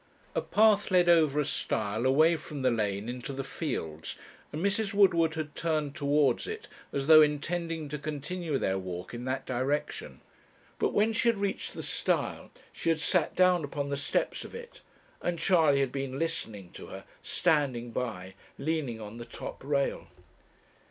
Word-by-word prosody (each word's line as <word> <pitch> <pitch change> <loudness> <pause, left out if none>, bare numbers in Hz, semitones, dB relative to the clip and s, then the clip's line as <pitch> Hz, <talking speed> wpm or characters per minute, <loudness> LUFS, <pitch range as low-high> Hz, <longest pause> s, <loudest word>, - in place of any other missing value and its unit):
A - - 0
path 210 -1 +4
led 180 -2 +4
over 155 -4 +5
a 150 - +2
stile 110 -3 -1
away 155 +6 +5
from 150 -3 -6
the 130 - +4
lane 105 -2 -1
into 125 +2 -5
the 135 0 -4
fields, 80 - -4 0.4
and 160 +5 -2
Mrs. 200 0 0
Woodward 170 -5 +4
had 155 -2 -4
turned 155 -4 -1
towards 145 -2 +2
it, 435 0 -6 0.2
as 140 -1 -2
though 155 +1 +9
intending 160 +2 0
to 150 +1 -4
continue 155 +2 -3
their 95 -5 0
walk 90 +1 -6
in 120 +1 -5
that 130 +1 -2
direction. 130 +4 -2 0.6
But - - +1
when 215 +2 +3
she 235 +1 +3
had 230 - +1
reached 200 -1 -2
the - - -5
stile, - - -1 0.2
she - - -2
had 165 -1 +2
sat 170 0 +1
down 180 -2 +4
upon 140 0 -3
the 140 - 0
steps 140 - -1
of - - -10
it, 475 +1 -10 0.4
and 175 -1 -1
Charley 160 -7 +4
had 135 -2 0
been 135 -1 -3
listening 110 - -3
to - - -10
her, - - -9 0.2
standing 140 -8 +1
by, 95 -7 -4 0.2
leaning 140 -6 -2
on 110 +1 -8
the 120 - -7
top 115 - -8
rail. 140 0 0
150 Hz, 170 wpm, -29 LUFS, 130-170 Hz, 0.6 s, though